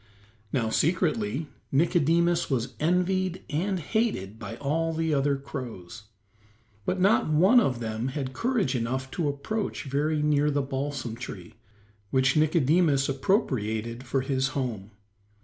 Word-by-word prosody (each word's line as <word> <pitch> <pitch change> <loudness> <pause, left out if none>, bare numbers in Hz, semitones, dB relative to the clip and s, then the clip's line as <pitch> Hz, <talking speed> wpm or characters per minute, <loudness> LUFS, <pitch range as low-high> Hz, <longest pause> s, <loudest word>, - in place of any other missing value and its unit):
Now, 115 -4 0
secretly, 150 - +1 0.3
Nicodemus 170 +3 +2
was 125 -2 -1
envied 180 +2 +1
and 185 +5 0
hated 150 - -1
by 115 - -6
all 160 +4 -1
the 160 -1 0
other 140 0 +2
crows, 120 -6 -8 0.8
but 185 - -1
not 195 -1 +3
one 185 +11 +6
of 130 - +1
them 110 +1 -3
had 135 -1 -4
courage 220 - 0
enough 130 +2 -2
to 160 -5 -1
approach 200 +10 -3
very 150 +2 0
near 150 0 +3
the 145 -1 0
balsam 135 -3 -3
tree, 110 -5 -8 0.6
which 130 +1 +2
Nicodemus 155 -2 +3
appropriated 120 - 0
for 135 +1 0
his 130 0 0
home. 110 -7 -3
140 Hz, 130 wpm, -27 LUFS, 125-165 Hz, 0.8 s, one